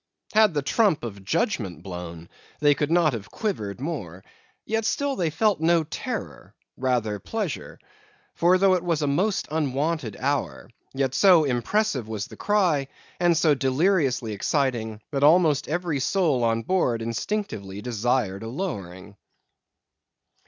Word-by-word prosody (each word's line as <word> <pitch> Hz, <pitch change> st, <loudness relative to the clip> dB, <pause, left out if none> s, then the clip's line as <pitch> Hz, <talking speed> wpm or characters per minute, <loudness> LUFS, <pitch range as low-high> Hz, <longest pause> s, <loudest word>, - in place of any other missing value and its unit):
Had 215 Hz, -5 st, +4 dB
the 145 Hz, -, 0 dB
trump 190 Hz, -2 st, +2 dB
of 100 Hz, -4 st, -7 dB
judgment 105 Hz, -, -1 dB
blown, 85 Hz, -3 st, -7 dB, 0.3 s
they 145 Hz, -1 st, +5 dB
could 145 Hz, +1 st, -1 dB
not 165 Hz, -3 st, +3 dB
have 105 Hz, -3 st, -6 dB
quivered 110 Hz, -, -3 dB
more; 105 Hz, -, -5 dB, 0.4 s
yet 225 Hz, +1 st, -1 dB
still 280 Hz, +4 st, 0 dB
they 170 Hz, -7 st, 0 dB
felt 205 Hz, +5 st, +1 dB
no 165 Hz, 0 st, +3 dB
terror; 150 Hz, -, -6 dB, 0.2 s
rather 120 Hz, -5 st, -1 dB
pleasure. 210 Hz, -, -4 dB, 0.6 s
For 175 Hz, +2 st, +4 dB
though 190 Hz, 0 st, +4 dB
it 180 Hz, -1 st, 0 dB
was 165 Hz, -4 st, 0 dB
a -, -, +2 dB
most 185 Hz, +9 st, 0 dB
unwonted 150 Hz, -4 st, -1 dB
hour, 140 Hz, -1 st, -2 dB, 0.2 s
yet 135 Hz, -1 st, 0 dB
so 180 Hz, +1 st, +6 dB
impressive 135 Hz, -, 0 dB
was 110 Hz, -2 st, -4 dB
the -, -, -12 dB
cry, 180 Hz, -10 st, +1 dB, 0.3 s
and 175 Hz, -2 st, +3 dB
so 155 Hz, -2 st, +4 dB
deliriously 135 Hz, -, +1 dB
exciting, 110 Hz, -2 st, -1 dB
that 140 Hz, -2 st, -1 dB
almost 155 Hz, -2 st, +4 dB
every 170 Hz, -2 st, -1 dB
soul 150 Hz, -4 st, +1 dB
on 115 Hz, 0 st, +1 dB
board 125 Hz, -11 st, 0 dB
instinctively 115 Hz, -, -3 dB
desired 115 Hz, -4 st, -1 dB
a 110 Hz, -, -6 dB
lowering. 100 Hz, -, -6 dB
145 Hz, 140 wpm, -25 LUFS, 115-175 Hz, 0.6 s, so